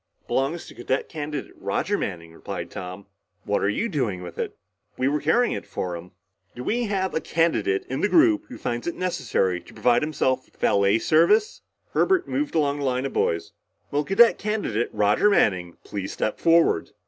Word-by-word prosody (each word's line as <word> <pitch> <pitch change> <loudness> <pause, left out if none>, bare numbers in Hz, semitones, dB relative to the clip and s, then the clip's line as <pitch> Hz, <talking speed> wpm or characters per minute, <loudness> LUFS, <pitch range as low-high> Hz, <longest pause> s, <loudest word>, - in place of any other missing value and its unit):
"Belongs 140 +6 -1
to - - -12
Cadet 130 +2 -2
Candidate 150 -3 -5
Roger 200 +7 -1
Manning," 85 - -4
replied - - -6
Tom. 95 +2 -7 0.4
"What - - 0
are 100 - +2
you 210 - 0
doing 120 - -2
with 85 -1 -9
it?" - - -3 0.4
"We 130 - +1
were 145 +1 0
carrying 245 0 +2
it - - -6
for 90 -1 -3
him." 85 +2 -10 0.4
"Do 125 - -6
we 240 - 0
have 190 -2 -1
a 160 - 0
candidate 150 - +1
in 130 - -3
the 205 - +2
group 325 -1 +4
who 260 - -9
finds 120 +4 -3
it 170 - -2
necessary 115 - 0
to - - -16
provide 120 -1 +3
himself 130 -4 0
with - - -29
valet 100 +1 +3
service?" 170 - +3 0.3
Herbert 370 -1 +2
moved 290 - -2
along 145 -2 +1
the 140 - -2
line 130 0 0
of 135 - -4
boys. 85 0 0 0.4
"Will 145 +1 +1
Cadet 195 +8 +5
Candidate 205 - -1
Roger 105 - +3
Manning 90 - +2
please 100 -2 -5
step 110 - -2
forward?" 165 0 +3
135 Hz, 185 wpm, -24 LUFS, -, 0.4 s, Cadet